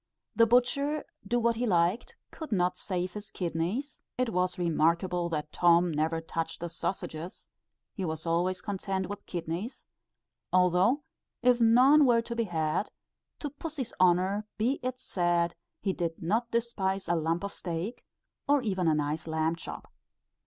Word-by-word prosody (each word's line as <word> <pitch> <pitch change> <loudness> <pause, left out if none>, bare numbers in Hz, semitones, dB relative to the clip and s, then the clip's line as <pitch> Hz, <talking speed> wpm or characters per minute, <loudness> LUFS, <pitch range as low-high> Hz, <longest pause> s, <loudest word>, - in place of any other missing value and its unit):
The 230 0 +5
butcher, 280 +5 +2 0.2
do 240 +3 +2
what 235 -1 +2
he 245 +1 0
liked, 175 +3 +1 0.2
could 315 -5 -8
not 180 -2 +2
save 180 0 -3
his 210 -1 -7
kidneys, 180 - -3 0.2
it 255 -1 +1
was 180 0 0
remarkable 170 +1 +1
that 150 -2 -3
Tom 175 0 +4
never 160 +2 0
touched 165 0 -4
the 170 - -4
sausages, 170 0 -5 0.5
he 195 - -4
was 160 -2 -3
always 180 +2 +1
content 190 -2 -2
with 205 0 -7
kidneys, 175 +8 -4 0.7
although 185 - +3 0.4
if 245 -1 +4
none 260 +6 +6
were 230 -1 +4
to 235 0 -5
be 230 -1 0
had, 160 +1 -1 0.5
to 290 - -5
pussy's 290 -3 -5
honour 185 +4 +3
be 245 +6 +1
it 255 0 -3
said, 175 -6 +1 0.3
he 195 -2 +1
did 170 -2 -3
not 225 +8 0
despise 200 -5 -1
a - - +2
lump 165 +2 0
of 200 - -4
steak 180 +7 -4 0.4
or 285 -2 +3
even 190 -6 0
a 155 - +4
nice 150 +2 -2
lamb 160 +1 0
chop. 165 - -9
185 Hz, 155 wpm, -29 LUFS, 170-235 Hz, 0.7 s, none